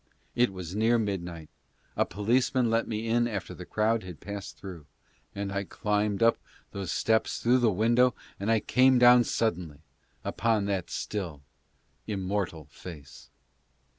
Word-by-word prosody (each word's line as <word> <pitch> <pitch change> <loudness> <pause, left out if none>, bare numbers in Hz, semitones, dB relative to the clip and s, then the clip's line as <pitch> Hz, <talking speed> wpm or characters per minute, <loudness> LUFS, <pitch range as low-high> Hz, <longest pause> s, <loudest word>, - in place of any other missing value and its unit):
It 125 -3 +2
was 90 -1 -7
near 115 +3 +3
midnight 90 -7 -3 0.3
— - - -38
a - - +1
policeman 120 +3 +1
let 115 0 +1
me 110 0 -3
in 120 +1 +2
after 100 -7 -4
the 90 - -10
crowd 110 +1 +1
had 90 -3 -9
passed 100 +1 -7
through 90 -6 -9 0.2
— 60 0 -37
and 100 0 -3
I 100 0 -1
climbed 105 +1 -1
up 115 - +4 0.3
those 95 -3 -4
steps 110 0 +1
through 125 +2 +3
the 120 -2 +4
window 120 +5 +3 0.2
and 110 +2 +1
came 130 0 +5
down 125 0 +7
suddenly 85 -9 -2 0.4
upon 110 -2 0
that 95 -3 -2
still, 85 -9 -4 0.6
immortal 95 -5 -2
face. 75 -6 -11
105 Hz, 150 wpm, -28 LUFS, 90-115 Hz, 0.6 s, down